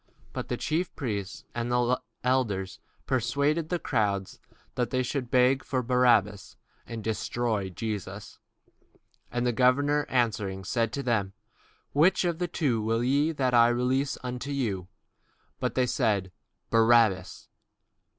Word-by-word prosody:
But - - -4
the - - -2
chief 165 +3 -1
priests 105 -8 -4
and 120 0 -3 0.5
elders 110 -7 0 0.3
persuaded 140 +6 0
the 180 - 0
multitude 100 - -1 0.3
that 120 -2 -1
they 130 0 0
should 125 -1 -3
ask 130 +1 +3 0.2
Barabbas, 115 -6 +2 0.3
and 115 -2 -6
destroy 110 -2 -1
Jesus. 100 0 -6 0.9
The 120 0 0
governor 140 +4 +2
answered 110 -5 +1
and 95 0 -8
said 115 +4 +1
unto 140 +5 -4
them, 110 -6 0 0.6
Whether 175 +4 +4
of 170 -1 -4
the 175 - 0
twain 135 -10 0
will 115 +2 0
ye 140 +5 +2
that 130 -5 0
I 120 -1 +7
release 130 +3 0
unto 125 +2 -5
you? 110 -10 -2 0.7
They 130 - +1
said, 105 -7 0 0.4
Barabbas. 115 -5 +3
120 Hz, 125 wpm, -28 LUFS, 105-135 Hz, 0.9 s, I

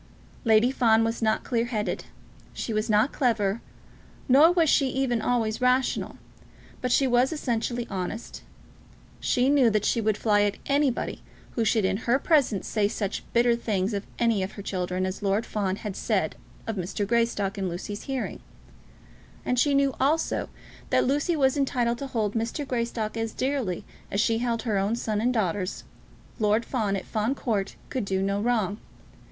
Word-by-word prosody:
Lady 225 +2 +5
Fawn 225 -4 +4
was 225 +1 -1
not 220 -1 +1
clear 235 -2 0
headed; 210 -6 -2 0.5
she 225 - -4
was 215 +1 -1
not 215 +5 +3
clever; 225 -5 +1 0.7
nor 290 +6 +7
was 340 -2 +3
she 275 -1 +4
even 255 -3 0
always 225 -1 0
rational. 250 +1 +1 0.6
But 250 - -1
she 270 - +4
was 250 +1 +3
essentially 240 -5 -2
honest. 195 +3 -5 0.8
She 250 +1 +2
knew 275 -4 +5
that 210 -1 0
she 230 - +2
would 215 -1 +1
fly 210 -2 +3
at 205 -1 +1
anybody 280 -3 0 0.3
who 230 - -1
should 220 -1 +2
in 190 +1 +1
her 235 +3 +2
presence 275 - +2
say 210 -2 +1
such 205 -2 -3
bitter 235 0 +4
things 210 -3 -1
of 200 0 -3
any 230 -4 +2
of 190 +2 -3
her 200 - -8
children 185 -1 -2
as 185 +2 -4
Lord 200 +2 +1
Fawn 195 -3 -1
had 205 -1 -6
said - - 0 0.3
of 225 -2 -3
Mr. 190 +3 -2
Greystock 215 -3 0
in 190 -1 -1
Lucy's 205 +4 -6
hearing; 270 -2 -3 1.1
and 250 - +1
she 285 +2 +3
knew 275 -1 +3
also 310 +4 +1 0.4
that - - +3
Lucy 290 +6 +1
was 265 -3 +3
entitled 240 -4 0
to 275 - -4
hold 220 -5 -1
Mr. 230 +5 -2
Greystock 235 -3 -2
as 225 -1 -2
dearly 255 -9 -2 0.2
as 200 - -1
she 225 +1 +2
held 235 -2 -1
her 215 -5 0
own 200 +4 0
sons 215 -3 -2
and 245 +2 +2
daughters. 195 -4 -1 0.6
Lord 215 +1 +2
Fawn, 215 -6 -1
at 190 - -4
Fawn 220 +5 -1
Court, 210 -7 -2 0.2
could 240 -7 -2
not 190 0 +1
do 200 0 0
wrong. 215 -4 0
225 Hz, 175 wpm, -26 LUFS, 205-250 Hz, 1.1 s, nor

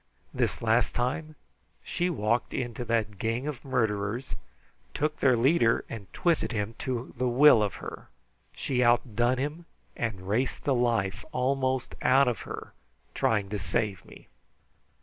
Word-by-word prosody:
This - - -1
last 115 +2 +2
time 150 +6 -2 0.5
she 175 +1 -1
walked 120 -6 0
into 120 -1 -3
that 110 -4 -1
gang 115 +4 -1
of 150 -5 -5
murderers, 115 -2 -1 0.6
took 155 +1 -1
their 130 -3 +4
leader, 120 -1 +3
and 100 -5 -8
twisted 170 -6 +1
him 105 -1 -2
to 125 -1 -3
the 125 - +2
will 125 -1 +7
of 105 -2 -1
her. - - -8 0.5
She 125 -2 0
outdone 120 +1 +2
him 150 +6 -3 0.3
and 95 -6 -3
raced 120 +6 -1
the 140 - +2
life 115 -7 0
almost 130 0 0
out 135 +1 +5
of 120 - 0
her - - -8 0.4
trying 105 -3 +1
to 105 0 -3
save 105 -4 -1
me. - - -15
120 Hz, 145 wpm, -28 LUFS, 110-130 Hz, 0.6 s, will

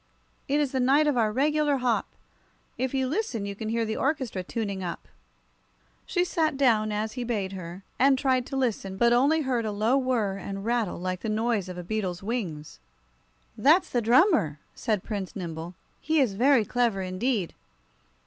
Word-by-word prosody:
It 285 +2 +1
is 290 -3 0
the 265 - -1
night 275 +4 +4
of 295 -2 +2
our 220 -3 +2
regular 295 +3 +2
hop 245 -3 0 0.7
if 260 0 -2
you 265 -1 0
listen 270 - -2
you 200 - -4
can 215 +2 -5
hear 230 0 0
the 220 0 -3
orchestra 265 -9 -1
tuning 200 0 -4
up." 175 -2 -5 1.0
She 355 -1 +1
sat 315 -5 0
down, 220 -6 +3
as 215 +1 -2
he 250 - -4
bade 210 -5 -2
her, 185 0 -8 0.2
and 270 +1 +5
tried 255 -2 +1
to - - -5
listen, 210 -7 -1
but 235 +3 +4
only 285 +6 +3
heard 255 -4 0
a 215 - -2
low 220 +6 +2
whirr 230 -7 0
and 195 0 -6
rattle 235 -4 0
like 185 +1 -3
the 220 - -4
noise 215 -3 0
of 180 - -7
a 180 - -5
beetle's 185 -2 -3
wings. 180 - -4 0.8
"That's 320 +7 +4
the 240 - +1
drummer," 240 - +4 0.2
said 215 -6 -1
Prince 200 -4 -5
Nimble. 170 -1 -6 0.2
"He 315 0 +1
is 250 -8 +2
very 245 +2 +4
clever, 235 -6 0
indeed." 185 +1 -1
230 Hz, 180 wpm, -27 LUFS, 195-265 Hz, 1.0 s, and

